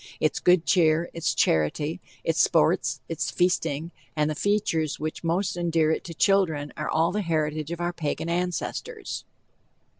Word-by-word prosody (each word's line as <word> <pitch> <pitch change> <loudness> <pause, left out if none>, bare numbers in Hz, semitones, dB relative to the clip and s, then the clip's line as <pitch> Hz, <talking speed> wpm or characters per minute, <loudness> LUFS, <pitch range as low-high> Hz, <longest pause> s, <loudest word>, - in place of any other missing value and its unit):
Its 155 - +1
good 180 -2 +4
cheer, 165 -1 +3
its 165 -2 -1
charity, 80 - +1 0.2
its - - +2
sports, - - +2
its 165 -1 -2
feasting, 170 -3 0 0.2
and 150 0 +1
the - - -1
features 165 -4 0
which 155 +2 -4
most 175 +4 0
endear 165 -2 +1
it - - -1
to 165 - -8
children 160 -8 +2
are 150 - -3
all 165 +2 +2
the 210 +3 -1
heritage 155 -3 -1
of 170 - -4
our 175 0 -1
Pagan 160 0 -3
ancestors. 180 - -3
165 Hz, 155 wpm, -26 LUFS, 155-175 Hz, 0.2 s, good